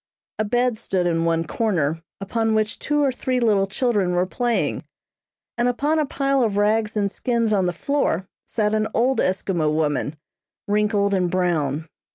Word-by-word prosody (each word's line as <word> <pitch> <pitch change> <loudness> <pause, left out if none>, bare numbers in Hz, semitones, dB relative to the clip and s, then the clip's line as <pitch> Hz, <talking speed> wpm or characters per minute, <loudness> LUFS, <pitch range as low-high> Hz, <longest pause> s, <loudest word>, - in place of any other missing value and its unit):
A - - +2
bed 240 +1 +1
stood 185 -2 -1
in 165 -1 +1
one 165 0 +1
corner, 165 -5 0 0.2
upon 220 +3 0
which 215 -1 0
two 295 0 +1
or 275 - +3
three 255 0 -1
little 205 -5 +2
children 205 -4 0
were 180 +1 +2
playing, 240 +5 -1 0.8
and 240 - +3
upon 290 +6 +1
a 300 - +1
pile 275 -1 +1
of 215 -4 +1
rags 215 +1 +1
and 200 -2 +1
skins 230 -1 0
on 190 -3 +2
the - - +1
floor 195 - -1 0.2
sat 210 -2 0
an 215 0 +1
old 255 +3 +2
Eskimo 180 -4 0
woman, 150 -1 0 0.5
wrinkled 205 -1 +1
and 180 -2 +1
brown. 160 -4 0
210 Hz, 170 wpm, -22 LUFS, 180-240 Hz, 0.8 s, or